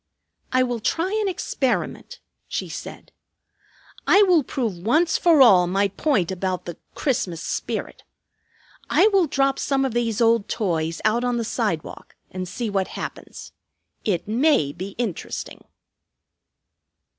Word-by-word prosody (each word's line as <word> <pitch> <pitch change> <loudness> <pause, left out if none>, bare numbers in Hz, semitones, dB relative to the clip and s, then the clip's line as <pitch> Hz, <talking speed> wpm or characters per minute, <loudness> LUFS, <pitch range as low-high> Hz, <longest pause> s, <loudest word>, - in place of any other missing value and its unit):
"I 255 0 +3
will 245 -2 -2
try 335 - -1
an 415 - 0
experiment," 275 -8 -2 0.3
she - - -4
said. - - -9 1.0
"I 410 - +6
will 360 -5 +4
prove 230 -8 -3
once 310 - +2
for 325 -6 +6
all 185 -7 +6
my 195 +2 +1
point 200 - 0
about 185 0 -3
the 175 - -7 0.2
'Christmas 195 - -1
spirit.' 170 - -4 0.9
I 425 - +5
will 390 -5 +3
drop 275 -1 +1
some 270 -1 +1
of 260 - -2
these 230 -3 -1
old 230 -2 +3
toys 165 -6 -1
out 225 +3 +2
on 245 -1 0
the 230 - -2
sidewalk 210 -9 -3 0.2
and 185 -1 -5
see 235 +6 -4
what 195 -2 -1
happens. - - -8 0.5
It 190 -5 -1
may 230 - +2
be 185 +5 -7
interesting." 225 -8 -5
230 Hz, 135 wpm, -23 LUFS, 185-270 Hz, 1.0 s, I